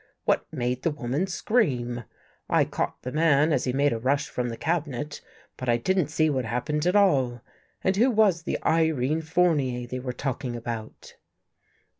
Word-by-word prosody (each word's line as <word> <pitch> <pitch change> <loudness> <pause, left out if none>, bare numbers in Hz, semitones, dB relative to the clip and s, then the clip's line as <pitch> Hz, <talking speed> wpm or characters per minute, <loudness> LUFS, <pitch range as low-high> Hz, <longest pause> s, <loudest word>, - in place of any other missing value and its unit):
What - - +1
made 125 +1 -2
the 165 - +1
woman 145 +4 -2
scream? 125 - 0 0.4
I - - +4
caught - - -3
the 125 - -4
man 155 0 +3
as 130 - +1
he 125 - 0
made 140 +1 +2
a 115 - -3
rush 135 +4 0
from 125 -1 -2
the 115 - -6
cabinet, 150 -4 -2 0.4
but 130 - -4
I 120 - +4
didn't 185 +6 +1
see 155 +1 +1
what 135 -4 0
happened 125 +8 -1
at 180 - +2
all. 135 - +3 0.4
And 190 - +2
who 235 +6 +4
was 210 -7 +3
the 170 - -2
Irene 160 -2 +2
Fournier 150 -7 +1
they 130 +1 -5
were 125 0 -4
talking 130 -2 -3
about? 115 -2 -7
140 Hz, 175 wpm, -26 LUFS, 125-165 Hz, 0.4 s, I